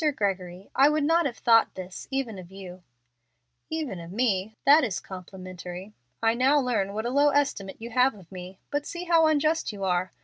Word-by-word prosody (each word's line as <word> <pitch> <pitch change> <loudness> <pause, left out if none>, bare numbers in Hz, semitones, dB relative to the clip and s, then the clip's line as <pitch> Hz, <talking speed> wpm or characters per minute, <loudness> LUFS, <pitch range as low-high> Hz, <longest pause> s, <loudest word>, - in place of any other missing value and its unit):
"Mr. 300 -3 +1
Gregory, 190 -2 -3
I 275 +2 +5
would 300 0 +1
not 330 +1 +3
have 240 - -7
thought 230 -1 +4
this 185 0 -8
even 265 -7 -3
of 175 -1 -11
you." 185 -2 -10 0.9
"Even 305 - -3
of 170 0 -9
me! 215 -2 0
That 290 +3 +7
is 210 -7 -1
complimentary. 185 +1 -9 0.3
I 225 0 +4
now 265 +5 +3
learn 220 -7 -1
what 220 +1 -3
a 240 - -1
low 285 +2 +4
estimate 275 -9 -1
you 235 +2 -8
have 250 +1 +3
of 190 -4 -16
me. 185 0 -9
But 290 0 -2
see 345 0 -5
how 335 -2 +4
unjust 310 0 +1
you 200 -2 -7
are. 180 -1 0
220 Hz, 200 wpm, -26 LUFS, 185-285 Hz, 0.9 s, That